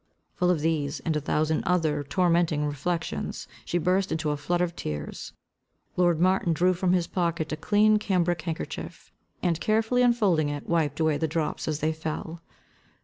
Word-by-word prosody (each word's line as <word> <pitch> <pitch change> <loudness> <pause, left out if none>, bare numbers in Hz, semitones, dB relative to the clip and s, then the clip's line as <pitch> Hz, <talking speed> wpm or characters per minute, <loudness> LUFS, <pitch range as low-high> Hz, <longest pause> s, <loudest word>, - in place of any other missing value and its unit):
Full 180 -1 +1
of 175 -4 +2
these, 150 -2 0
and 160 - -1
a 150 - 0
thousand 155 +2 0
other 165 -6 +1
tormenting 170 -1 +1
reflections, 145 - -3 0.2
she 175 - -1
burst 185 +3 +1
into 155 -2 -1
a - - 0
flood 175 +4 -1
of 175 -1 -1
tears. 75 - -6 0.6
Lord 175 -3 +3
Martin 185 -1 +2
drew 180 +4 +3
from 180 0 +1
his 180 -2 +2
pocket 170 -3 -1
a - - 0
clean 210 +6 +3
cambric 175 -5 0
handkerchief, 165 -1 -6 0.3
and, 170 -3 0
carefully 225 +3 +2
unfolding 205 -11 +3
it, 145 -1 -5
wiped 155 -4 0
away 160 -2 +2
the 160 - +1
drops 155 0 -2
as 155 -1 -2
they 155 +1 +1
fell. 160 +1 -5
165 Hz, 170 wpm, -26 LUFS, 155-180 Hz, 0.6 s, Lord